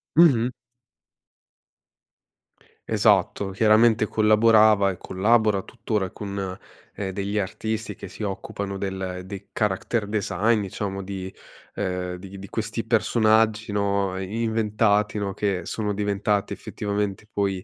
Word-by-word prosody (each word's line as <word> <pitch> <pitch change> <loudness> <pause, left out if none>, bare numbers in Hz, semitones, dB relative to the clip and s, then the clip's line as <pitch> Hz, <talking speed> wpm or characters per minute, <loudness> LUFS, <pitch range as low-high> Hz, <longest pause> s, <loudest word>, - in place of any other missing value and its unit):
Mh-mh. 130 -8 +5 2.4
Esatto, 100 -2 +2
chiaramente 110 +1 +4
collaborava 110 -2 +5
e 95 - -4
collabora 105 +2 +2
tuttora 110 -3 -3
con, 100 -2 -5 0.4
ehm, 100 -2 -3
degli 100 +2 -3
artisti 110 +3 -3
che - - -9
si 110 - -8
occupano 100 0 -4
del 95 -1 -4
dei 100 +1 -9
character 105 +1 -1
design, 110 +1 +1
diciamo 100 0 -4
di 95 -1 -6 0.4
uhm, 90 -2 -2
di 95 +2 -10
di 95 0 -9
questi 110 0 -3
personaggi, 110 -1 +2
no, 100 -2 0
i 100 +5 -4
inventati, 105 -2 +1
no, 100 -1 -2
che 100 -3 0
sono 105 -2 -2
diventati 100 0 0
effettivamente, 105 0 -3
poi, 95 -2 -1
105 Hz, 115 wpm, -24 LUFS, 95-110 Hz, 2.4 s, Mh-mh